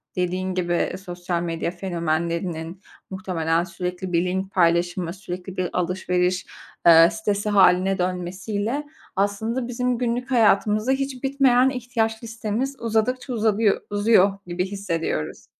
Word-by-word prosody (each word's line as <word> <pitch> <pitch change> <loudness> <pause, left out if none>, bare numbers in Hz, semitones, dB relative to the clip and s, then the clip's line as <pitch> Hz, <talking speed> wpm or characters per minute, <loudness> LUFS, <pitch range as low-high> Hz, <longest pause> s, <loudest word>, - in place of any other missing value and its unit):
dediğin 185 +1 -1
gibi, 175 -1 0
sosyal 175 -1 -3
medya 170 0 -2
fenomenlerinin 170 0 -3 0.3
muhtemelen 170 -3 -1
sürekli 180 +1 -5
bir 170 +1 +2
link 190 +1 -2
paylaşımı, 175 0 +1
sürekli 185 -1 -7
bir 180 -1 -1
alışveriş, 180 0 0 0.4
eee, 165 0 +8
sitesi 210 -1 -1
hâline 190 -1 +4
dönmesiyle 190 +8 -2 0.3
aslında 220 +5 -1
bizim 250 0 -1
günlük 245 +2 -2
hayatımızda 215 0 +3
hiç 270 -1 -2
bitmeyen 265 -2 +4
ihtiyaç 235 -3 -2
listemiz 225 +4 -3
uzadıkça 235 +3 0
uzadıyo 220 -2 +3 0.2
uzuyor 205 -1 +4
gibi 175 +1 -1
hissediyoruz. 180 - -3
190 Hz, 115 wpm, -23 LUFS, 175-225 Hz, 0.4 s, eee